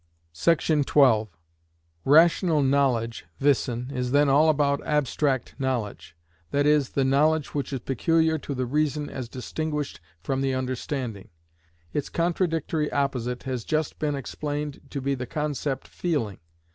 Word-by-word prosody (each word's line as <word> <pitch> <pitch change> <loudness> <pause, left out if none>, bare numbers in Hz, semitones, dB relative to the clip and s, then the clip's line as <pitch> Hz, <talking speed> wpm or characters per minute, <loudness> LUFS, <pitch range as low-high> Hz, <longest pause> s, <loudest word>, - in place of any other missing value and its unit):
§ 155 - +2
12. 120 -7 +4 0.8
Rational 160 +1 +5
knowledge 125 -7 +1
(wissen) 125 -2 +1
is 125 -1 -2
then 145 +2 +4
all 150 +4 +5 0.3
abstract 145 -2 0
knowledge,—that 100 - -3
is, 150 -3 +3
the 135 - 0
knowledge 150 +3 +2
which 145 -1 -2
is 135 -3 -3
peculiar 160 +5 +1
to 140 - -5
the 130 0 -1
reason 150 +2 -1
as 125 -3 -6
distinguished 150 +3 -4 0.2
from 135 -1 -1
the 135 -1 0
understanding. 130 -4 -4 0.6
Its 145 - -2
contradictory 165 -3 0
opposite 125 -3 -1
has 130 -3 -3
just 155 +4 -1
been 150 -2 0
explained 145 +1 -4
to 140 - -4
be 140 +1 0
the 125 -2 -4
concept 145 -2 -3
"feeling." 130 - -2
140 Hz, 130 wpm, -26 LUFS, 125-150 Hz, 0.8 s, Rational